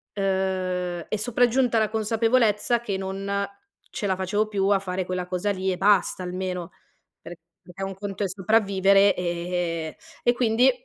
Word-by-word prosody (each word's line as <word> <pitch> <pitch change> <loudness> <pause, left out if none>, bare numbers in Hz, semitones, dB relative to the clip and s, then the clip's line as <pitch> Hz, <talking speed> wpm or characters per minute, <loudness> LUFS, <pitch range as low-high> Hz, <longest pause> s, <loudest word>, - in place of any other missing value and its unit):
uhm, 185 -3 -1
è - - 0
sopraggiunta 245 +2 +2
la 215 -1 +1
consapevolezza 225 +1 +2
che 210 -5 -3
non 195 +1 -2 0.5
ce 205 - -3
la 190 - +1
facevo 205 +3 0
più 200 -2 0
a 200 -1 +4
fare 185 -1 -3
quella 185 0 -3
cosa 180 +3 -1
lì 190 -1 -1
e 180 - -2
basta, 195 -1 +2
almeno, 180 -1 -4 0.5
per 170 - -9 0.3
perché 180 +1 -10
un 195 0 -5
conto 200 0 -5
è - - -1
sopravvivere, 195 0 +3
ehm 170 -2 -2 0.3
e 240 - +4
quindi 240 +1 +3
195 Hz, 155 wpm, -25 LUFS, 185-215 Hz, 0.5 s, a